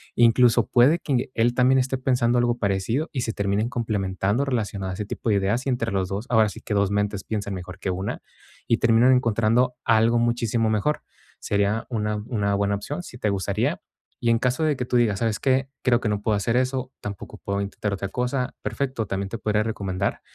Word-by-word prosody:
Incluso 120 -1 +4
puede 135 +8 +4
que 130 -4 -1
él 120 +1 +2
también 130 +1 +4
esté 130 +1 0
pensando 125 -2 +1
algo 120 0 +2
parecido, 100 - 0
y 130 - -1
se 115 - -1
terminen 100 +3 0
complementando 105 0 -1
relacionado 100 -7 -2
a - - -4
ese 105 - -4
tipo 110 - -4
de 105 - +3
ideas, 100 +6 0
y - - +2
entre 115 -2 -1
los 95 -1 0
2 100 +4 -3
ahora 110 -3 +4
sí 110 - -9
que 105 - -4
2 100 -1 +2
mentes 105 -1 -1
piensan 105 -2 -3
mejor 90 0 -7
que 95 - -2
1, 95 +3 -4 0.5
y 115 - +3
terminan 120 +2 +5
encontrando 120 +1 +2
algo 115 +1 +4
muchísimo 115 -1 +1
mejor. 110 +8 0 0.4
Sería 100 +2 0
una 105 -3 -1
una 100 -5 0
buena 100 0 +1
opción, 145 - -5
si 120 - -10
te 105 - 0
gustaría. 95 -3 -1 0.4
Y 120 - +1
en 115 - +3
caso 125 +5 0
de 155 -2 +2
que 125 - -2
tú 125 - -2
digas: 105 -5 +2
"¿Sabes 115 -3 0
qué?, 135 0 +1
creo 125 -2 +3
que 115 - -3
no 105 -1 -1
puedo 105 0 +1
hacer 115 +4 0
eso, 130 0 -1
tampoco 100 -1 -7
puedo 100 0 -2
intentar 100 0 -3
otra 100 0 -3
cosa", 125 +3 -2
perfecto, 130 -5 -2
también 95 0 -2
te 115 - -4
podría 105 0 0
recomendar, 100 -3 -2
115 Hz, 210 wpm, -24 LUFS, 100-125 Hz, 0.5 s, terminan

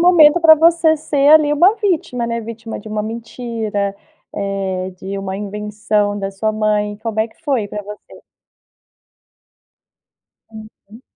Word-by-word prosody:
momento 345 -2 +6
pra 320 -1 +8
você 325 0 +3
ser 290 -2 +1
ali, 305 -1 +6
uma 360 +8 +4
vítima, 325 - -1
né. 230 0 -2
Vítima 225 0 -7
de 215 - -11
uma 215 0 -2
mentira, 225 -3 -4 0.4
eh, 195 -2 -3
de 190 +2 -7
uma 190 0 -4
invenção 210 0 -2
da 195 0 -3
sua 215 +3 -2
mãe. 210 -1 0
Como 220 -1 -3
é 225 - 0
que - - -27
foi 255 -9 0
pra 210 - -6
você? 205 +1 -12 2.3
Uhum. 220 +1 -14
220 Hz, 140 wpm, -18 LUFS, 205-285 Hz, 2.3 s, pra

